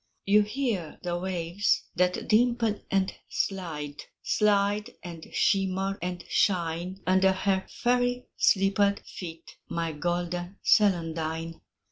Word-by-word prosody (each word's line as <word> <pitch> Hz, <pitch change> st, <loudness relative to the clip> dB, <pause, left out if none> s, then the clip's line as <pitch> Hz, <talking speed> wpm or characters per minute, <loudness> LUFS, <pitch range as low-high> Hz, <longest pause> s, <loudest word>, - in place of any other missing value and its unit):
You 205 Hz, +2 st, +5 dB
hear 210 Hz, -, -2 dB
the 175 Hz, -1 st, -1 dB
waves 180 Hz, +1 st, 0 dB
that 180 Hz, +1 st, 0 dB
dimple 230 Hz, -1 st, +2 dB
and 195 Hz, -1 st, +1 dB, 0.2 s
slide, 155 Hz, -7 st, -3 dB, 0.3 s
Slide 205 Hz, +1 st, +2 dB
and 170 Hz, -2 st, -8 dB
shimmer 195 Hz, 0 st, +1 dB
and 180 Hz, 0 st, -4 dB
shine, 175 Hz, 0 st, 0 dB
Under 190 Hz, +1 st, +4 dB
her 190 Hz, 0 st, 0 dB
fairy 245 Hz, 0 st, 0 dB
slippered 200 Hz, +1 st, +3 dB
feet 165 Hz, -2 st, -9 dB
My 165 Hz, -1 st, -2 dB
golden 175 Hz, +3 st, -3 dB
celandine. 165 Hz, -4 st, +1 dB
190 Hz, 105 wpm, -28 LUFS, 170-205 Hz, 0.3 s, You